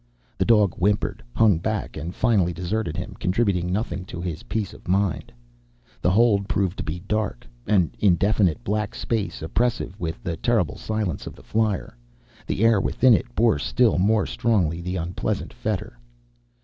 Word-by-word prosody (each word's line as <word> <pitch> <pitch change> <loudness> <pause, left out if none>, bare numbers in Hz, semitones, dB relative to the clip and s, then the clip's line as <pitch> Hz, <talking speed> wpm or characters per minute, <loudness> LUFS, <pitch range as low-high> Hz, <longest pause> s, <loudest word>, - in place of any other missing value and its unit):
The - - +2
dog 105 -5 +4
whimpered, 105 +3 +1
hung 105 -7 +4
back, 105 +3 -3
and 80 +3 -5
finally 100 -8 +2
deserted 90 0 -2
him, 90 - -5
contributing 90 -3 +1
nothing 95 -1 -2
to 85 - -7
his 85 -3 -4
peace 110 -3 -3
of - - -15
mind. 95 -1 0 0.7
The - - +3
hold 100 -1 +3
proved 95 -2 0
to - - -2
be 80 +4 -4
dark. 105 - -2 0.2
An 95 -6 +3
indefinite 95 -2 +2
black 105 +1 -2
space, 110 -8 -2
oppressive 110 +1 -1
with 85 +4 -4
the 85 -4 -3
terrible 110 - +1
silence 110 -7 -3
of - - -7
the - - -16
flier. 105 - -1 0.5
The 110 - +1
air 115 -4 +5
within 125 +4 +4
it 120 +2 0
bore 115 -9 +3
still 115 - +2
more 105 +2 +3
strongly 90 -8 0
the 90 +2 -3
unpleasant 85 0 -3
fetor. - - -4
100 Hz, 160 wpm, -24 LUFS, 85-110 Hz, 0.7 s, air